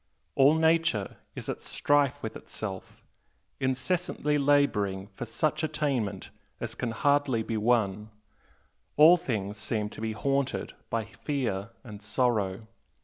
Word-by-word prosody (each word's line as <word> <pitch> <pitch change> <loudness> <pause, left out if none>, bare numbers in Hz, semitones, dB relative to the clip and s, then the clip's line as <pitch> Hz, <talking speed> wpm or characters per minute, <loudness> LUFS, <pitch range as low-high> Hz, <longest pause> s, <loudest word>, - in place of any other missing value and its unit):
All 140 +3 +5
Nature 160 -10 +2 0.2
is - - -6
at - - -4
strife 145 -1 +1
with 110 - -4
itself, 95 -4 -7 0.6
incessantly 145 +3 0
labouring 110 -10 +2
for 120 +5 -6
such 150 +6 0
attainment 140 - -2 0.3
as - - -4
can 120 - -3
hardly 140 0 +2
be 115 - -3
won, 105 -2 +1 0.9
all 160 +4 +9
things 105 - -3
seem 105 0 -2
to - - -9
be 110 -1 -2
haunted 135 +4 -1 0.2
by 115 -2 -1
fear 115 -4 -3
and 105 -4 -10
sorrow. 110 -2 0
120 Hz, 125 wpm, -28 LUFS, 105-145 Hz, 0.9 s, all